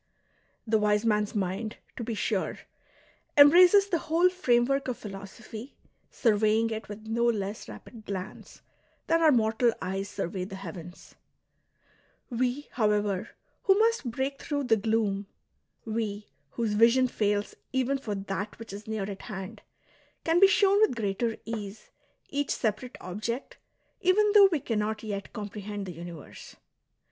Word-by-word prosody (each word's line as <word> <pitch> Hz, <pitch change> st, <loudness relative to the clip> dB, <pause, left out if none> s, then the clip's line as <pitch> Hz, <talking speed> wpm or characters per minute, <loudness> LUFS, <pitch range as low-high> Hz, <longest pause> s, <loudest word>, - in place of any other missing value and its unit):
The 220 Hz, -1 st, +2 dB
wise 210 Hz, +1 st, +2 dB
man's 210 Hz, -1 st, +1 dB
mind, 200 Hz, +3 st, -2 dB, 0.2 s
to 240 Hz, -, -5 dB
be 230 Hz, 0 st, -3 dB
sure, -, -, -1 dB, 0.8 s
embraces 355 Hz, +7 st, +8 dB
the 350 Hz, -4 st, 0 dB
whole 335 Hz, +4 st, +3 dB
framework 275 Hz, -5 st, +2 dB
of 255 Hz, -, -2 dB
philosophy, 215 Hz, +5 st, -9 dB, 0.3 s
surveying 220 Hz, 0 st, +2 dB
it 220 Hz, -1 st, -5 dB
with 210 Hz, +1 st, -8 dB
no 230 Hz, +2 st, 0 dB
less 210 Hz, -, -1 dB
rapid 215 Hz, -, -12 dB
glance 190 Hz, -2 st, -7 dB, 0.4 s
than 330 Hz, 0 st, +2 dB
our 315 Hz, -2 st, +6 dB
mortal 230 Hz, -1 st, +3 dB
eyes 195 Hz, +1 st, -3 dB
survey 180 Hz, 0 st, -3 dB
the 195 Hz, +1 st, -7 dB
heavens; 175 Hz, -2 st, -9 dB, 1.2 s
we, 250 Hz, +4 st, -1 dB
however, 210 Hz, -3 st, 0 dB, 0.4 s
who 385 Hz, 0 st, +5 dB
must 450 Hz, -, +2 dB
break 265 Hz, +4 st, -3 dB
through 285 Hz, -2 st, -2 dB
the 240 Hz, -4 st, +4 dB
gloom, 205 Hz, -2 st, 0 dB, 0.6 s
we 215 Hz, -2 st, -3 dB, 0.2 s
whose 225 Hz, -3 st, -1 dB
vision 235 Hz, +4 st, +5 dB
fails 205 Hz, -3 st, -1 dB, 0.2 s
even 265 Hz, +1 st, 0 dB
for 210 Hz, -6 st, -4 dB
that 195 Hz, +1 st, -4 dB
which 225 Hz, -3 st, -9 dB
is 205 Hz, +2 st, -9 dB
near 220 Hz, -2 st, -2 dB
at 195 Hz, -2 st, -7 dB
hand, 205 Hz, +1 st, -7 dB, 0.6 s
can 330 Hz, +1 st, +3 dB
be 390 Hz, -, +9 dB
shown 400 Hz, +1 st, +4 dB
with 430 Hz, -, +4 dB
greater 225 Hz, +1 st, -1 dB
ease 215 Hz, -2 st, -6 dB, 0.4 s
each 285 Hz, 0 st, -2 dB
separate 230 Hz, +3 st, -2 dB
object 215 Hz, +8 st, -5 dB, 0.4 s
even 405 Hz, +3 st, +4 dB
though 405 Hz, -2 st, +9 dB
we 320 Hz, -, +1 dB
cannot 215 Hz, -2 st, -2 dB
yet 200 Hz, -2 st, -5 dB
com 210 Hz, -2 st, -5 dB
prehend 205 Hz, 0 st, -6 dB
the 180 Hz, -, -6 dB
universe. 170 Hz, -2 st, -10 dB
220 Hz, 145 wpm, -28 LUFS, 205-255 Hz, 1.2 s, be